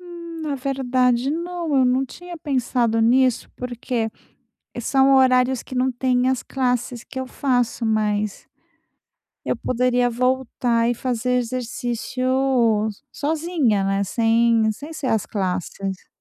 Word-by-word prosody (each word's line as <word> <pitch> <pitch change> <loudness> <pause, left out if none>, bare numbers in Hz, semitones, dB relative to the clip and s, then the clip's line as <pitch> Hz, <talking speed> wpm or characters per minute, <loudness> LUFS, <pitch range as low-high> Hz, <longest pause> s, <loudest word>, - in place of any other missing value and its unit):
Hum, 340 -2 -9
na 295 -2 -2
verdade, 255 -1 +1
não. 340 -2 -2
Eu 260 - +5
não 255 +2 +2
tinha 350 +5 -10
pensado 250 -6 0
nisso, 250 +2 +3
porque 245 -2 -3 0.7
são 270 +2 +4
horários 255 -1 +3
que 260 - -9
não 255 +1 +2
tem 250 0 +1
as 260 -2 -1
classes 245 -2 -1
que 260 - -7
eu 260 - -4
faço. 245 -4 0
Mas 210 -2 -1 1.0
eu - - -1
poderia 250 0 +1
voltar 245 -1 +1
e - - 0
fazer 250 0 -1
exercício 245 0 -3 0.9
sozinha, 295 - 0
né, 195 +1 +1
sem 230 +1 +3
sem 295 +8 -9
ser 305 -4 -5
as 220 -3 +1
classes. 190 -1 -3
250 Hz, 125 wpm, -22 LUFS, 230-265 Hz, 1.0 s, Eu